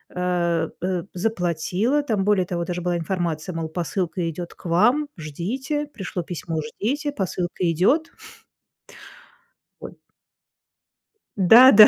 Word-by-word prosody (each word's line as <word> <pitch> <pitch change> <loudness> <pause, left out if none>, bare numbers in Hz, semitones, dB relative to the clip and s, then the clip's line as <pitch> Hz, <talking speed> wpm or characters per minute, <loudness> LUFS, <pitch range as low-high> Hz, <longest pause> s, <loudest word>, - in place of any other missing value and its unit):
Э, 175 -2 +1
э, 180 -1 -1
заплатила, 185 - 0
там, 220 -8 0
более 200 -2 +3
того, 170 -1 -2
даже 180 0 -3
была 175 0 0
информация, 170 0 -2
мол, 165 -1 -2
посылка 175 +1 -2
идёт 170 +2 -6
к - - -21
вам, 230 - +3
ждите. 240 - -3
Пришло 195 -9 -5
письмо, 165 -1 -4
ждите, 260 - -2
посылка 185 - -3
идёт. 270 - +2 1.7
Ой. - - -8 1.4
Да-да, 220 +3 +9
180 Hz, 110 wpm, -23 LUFS, 170-220 Hz, 1.7 s, Да-да